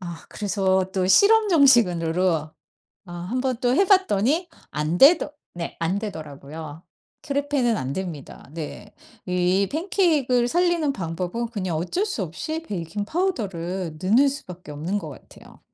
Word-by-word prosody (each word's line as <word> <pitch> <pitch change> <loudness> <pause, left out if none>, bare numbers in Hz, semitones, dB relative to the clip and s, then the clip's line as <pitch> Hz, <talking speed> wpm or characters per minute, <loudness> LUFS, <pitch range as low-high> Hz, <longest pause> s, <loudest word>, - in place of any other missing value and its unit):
아 170 -2 -8
그래서 190 -2 0
또 185 -1 0
실험 425 - +5
정신으로 185 - +4 0.8
아 175 - -8 0.2
1 255 +3 -1
번 260 -2 -1
또 245 -1 +2
해봤더니 345 - +3 0.2
안 150 +4 -1
되더 295 - +6 0.2
네 170 -1 -6
안 170 +4 0
되더라고요. 155 -4 -8 0.4
크레페는 280 -5 0
안 130 0 -3
됩니다. 165 -7 -7
네 170 +6 -7 0.3
이 180 +2 +2
팬케이크 325 -4 +1
을 245 -1 +3
살리는 340 -1 +1
방법은 180 +5 -3
그냥 185 -7 -3
어쩔 185 - -1
수 390 - -3
없이 310 - -5
베이킹파우더를 195 - -3
넣는 225 +10 +4
수밖에 180 - -8
없는 160 +7 -3
것 160 - -7
같아요. 140 - -15
200 Hz, 280 characters per minute, -24 LUFS, 170-280 Hz, 0.8 s, 되더